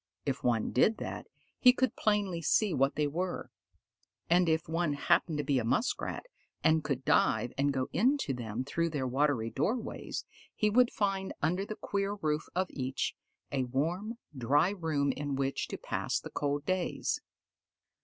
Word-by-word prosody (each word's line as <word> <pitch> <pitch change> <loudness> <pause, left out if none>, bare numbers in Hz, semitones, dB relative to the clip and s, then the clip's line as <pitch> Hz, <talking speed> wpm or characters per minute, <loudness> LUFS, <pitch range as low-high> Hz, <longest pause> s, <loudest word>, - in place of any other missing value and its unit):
If 140 -2 -2
one 115 -3 +1
did 215 - +3
that, - - -5 0.3
he 250 -1 +8
could 260 0 0
plainly 205 -5 +1
see 195 +4 +2
what 135 0 +2
they 150 - +1
were; 175 +5 -3 0.8
and 175 -1 +5
if 160 +1 +1
one 165 -1 0
happened 150 +2 +2
to 150 - 0
be 140 -2 +2
a - - -1
Muskrat, 130 - -1 0.4
and 160 -1 +4
could 135 -3 -2
dive 120 - +3
and 140 +1 +2
go 130 -2 -1
into 250 - +2
them 120 -1 -4
through 165 +4 0
their 145 -4 -2
watery 130 -3 +1
doorways, 220 - -2 0.3
he 210 -1 +2
would 245 +2 +5
find 195 -2 -1
under 180 +6 +1
the 215 - -4
queer 200 0 -2
roof 155 -5 -1
of 185 +1 +2
each, 130 -1 -2 0.4
a 130 -2 0
warm, 170 - -2 0.2
dry 145 +8 +3
room 155 -7 0
in 145 +1 -3
which 135 0 -1
to - - -5
pass - - -2
the - - -9
cold 145 0 -1
days. 185 -1 -1
155 Hz, 165 wpm, -31 LUFS, 135-190 Hz, 0.8 s, he